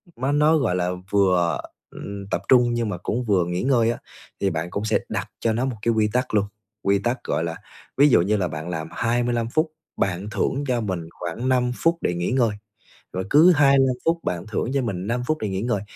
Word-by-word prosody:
mà 130 +3 -1
nó, 150 +2 +4
gọi 115 -11 +1
là, 90 -1 0 0.2
vừa, 90 -4 +2 0.3
ừm, 100 -1 -7
tập - - 0
trung 120 -2 +5
nhưng 115 -2 -1
mà 95 - -3
cũng 115 +7 -2
vừa 95 -5 +2
nghỉ 90 +1 -2
ngơi 120 -3 +3
á, 120 - -4 0.4
thì 100 - +2
bạn 80 0 -3
cũng 100 +4 -3
sẽ 110 - +2
đặt - - -3
cho 115 - +1
nó 120 +4 0
một 130 -3 -2
cái 115 +1 +2
quy 110 -1 +2
tắc 125 -1 0
luôn, 105 -1 +3 0.4
quy 100 0 +2
tắc, 120 +5 -2
gọi - - -1
là 85 -1 -3 0.4
ví 145 +2 +6
dụ 120 - +5
như 105 +4 +1
là 90 - 0
bạn 80 +1 -6
làm 80 -2 -4
25 120 0 0
phút, 155 +4 0 0.3
bạn 95 +1 -1
thưởng 135 +5 -1
cho 125 -2 +1
mình 90 -6 -4
khoảng 100 +10 -3
5 125 -1 +2
phút 165 +4 +1
để - - 0
nghỉ 85 +4 -2
ngơi, 120 -3 +2 0.6
rồi 95 +1 -2
cứ 160 +5 +7
25 140 -4 +4
phút 165 +1 +2
bạn 85 +1 -3
thưởng 110 +3 -2
cho 140 - +1
mình 100 -6 -3
5 120 +2 -1
phút 155 - +1
để 105 - -1
nghỉ 95 +1 -2
ngơi. 115 -4 0
115 Hz, 235 wpm, -23 LUFS, 95-130 Hz, 0.6 s, cứ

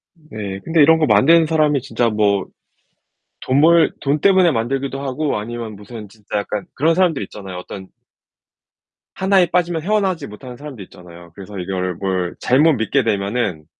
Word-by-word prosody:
네 110 - -7
근데 165 -1 +2
이런 160 +2 +6
거 155 - +3
만드는 165 +4 +5
사람이 150 -3 +2
진짜 120 -2 -1
뭐 105 -3 +1 1.0
돈 130 +2 +1
벌 165 +2 +5
돈 140 +2 0
때문에 190 -1 +4
만들기도 135 +2 -2
하고 140 -1 -2
아니면 115 0 -6
무슨 105 0 -10
진짜 105 0 -6
약간 100 0 -4
그런 160 +4 +2
사람들 175 - +1
있잖아요. 95 -2 -9
어떤 95 +1 -9 1.3
하나에 190 -1 +3
빠지면 170 -2 0
헤어 215 +3 +1
나오지 190 -4 -2
못하는 125 +4 -11
사람도 145 -6 -9
있잖아요. 85 -1 -15
그래서 100 +1 -10
이걸 90 0 -3
뭘 95 -1 -2
잘못 150 +6 +3
믿게 130 +2 0
되면은 100 -6 -2
125 Hz, 350 characters per minute, -19 LUFS, 100-160 Hz, 1.3 s, 이런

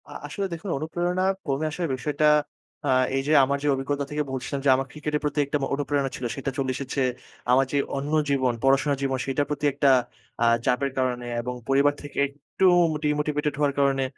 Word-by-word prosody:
আ - - -11 0.2
আসলে 200 - -3
দেখুন 170 +4 -6
অনুপ্রেরণা 175 +4 -1 0.2
কমে 140 +1 -1
আসার 170 +2 -2
বিষয়টা, 145 +4 -1 0.6
আ - - +1 0.3
এই 135 - +1
যে - - +1
আমার 140 +1 +1
যে - - 0
অভিজ্ঞতা 140 +1 -2
থেকে 150 0 -1
বলছিলাম 130 +2 -3
যে, - - +5
আমার 135 +1 -2
ক্রিকেটের 150 0 -3
প্রতি 150 0 -1
একটা 140 +2 -1
মো 135 - 0
অনুপ্রেরণা 140 -1 -1
ছিল। 125 - -5
সেটা 135 0 -3
চলে 135 -2 0
এসেছে 135 +1 -3 0.5
আমার 135 +2 +5
যে 145 - +1 0.2
অন্য 140 +2 -3 0.2
জীবন, 130 -3 +2
পড়াশোনার 135 +1 +3
জীবন, 135 -1 0
সেটার 140 +1 0
প্রতি 150 0 -2
একটা 140 0 +3 0.5
আ - - +4 0.2
চাপের 135 +2 +1
কারণে 125 -2 -1 0.2
এবং 125 +1 -4
পরিবার 140 +1 +4
থেকে 145 - -10
একটু 145 +6 -3 0.3
মোটি 150 -1 -1
মোটিভেটেড 150 0 -1
হওয়ার 145 -1 +2
কারণে। 135 -1 +2
140 Hz, 195 wpm, -25 LUFS, 135-150 Hz, 0.6 s, যে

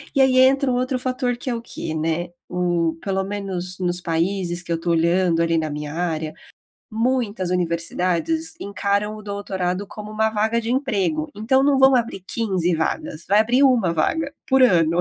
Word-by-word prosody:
E 275 - +4
aí 260 -1 +4
entra 265 0 +4
um - - +1
outro 255 +1 -1
fator, 255 -1 -1
que 255 - -5
é 240 - -1
o 230 - -5
quê, 160 -8 -6
né, 165 +2 -1 0.2
o 175 -2 0
pelo 195 -1 -1
menos, 190 -2 -4
nos 175 0 +1
países 175 +1 -1
que 170 - -8
eu 165 - 0
tô 170 0 -1
olhando, 170 +1 +2
ali, 165 0 +2
na 155 -1 -1
minha 150 0 -5
área, 160 -2 -2 0.6
muitas 225 -5 -1
universidades 180 - -1
encaram 200 +1 -1
o 215 - -9
doutorado 195 -2 -3
como 210 0 -9
uma 220 +1 +1
vaga 220 +2 0
de 230 +1 -3
emprego. 195 - 0
Então 265 +6 +2
não 280 -1 +3
vão 265 0 +6
abrir 230 -5 -1
15 185 -7 0
vagas. 160 0 -3
Vai 205 +2 +4
abrir 245 +5 +3
1 230 -11 +3
vaga, 285 - 0
por 265 -1 +4
ano. 170 -7 +4
195 Hz, 185 wpm, -22 LUFS, 170-240 Hz, 0.6 s, vão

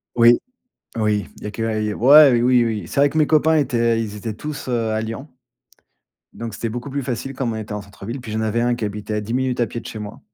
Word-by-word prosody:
Oui. 120 0 +6 0.6
Oui, 105 -2 0
il - - -13
y - - -4
a - - -5
que 110 - -6
a 110 -1 -1
i 105 0 -1
ouais, 140 +5 +7
oui, 125 0 +4
oui. 110 -3 -3
C'est - - -3
vrai 145 - +5
que 155 - -4
mes 155 -2 +4
copains 160 +1 +4
étaient 115 -5 +1
ils 105 -2 -5
étaient 105 +1 -5
tous, 150 +7 -7
heu, 115 -3 0
à 110 0 0
Lyon, 115 +6 -6 1.1
donc, 115 -1 -6
c'était 115 +2 -4
beaucoup 120 +5 -6
plus 140 +1 -2
facile, 130 +1 -4
comme 125 -4 -2
on - - -4
était 110 -1 -6
en 105 - -3
centre-ville. 100 +5 -8
Puis, 110 -3 -8
j'en 110 +1 -1
avais 110 +1 0
un 120 0 +2
qui 115 - -4
habitait 105 +1 -4
à 105 - 0
10 110 +2 -5
minutes 130 0 0
à 120 - +2
pied 115 - -6
de - - -11
chez 110 - -7
moi. 105 -1 -8
115 Hz, 275 wpm, -21 LUFS, 110-130 Hz, 1.1 s, ouais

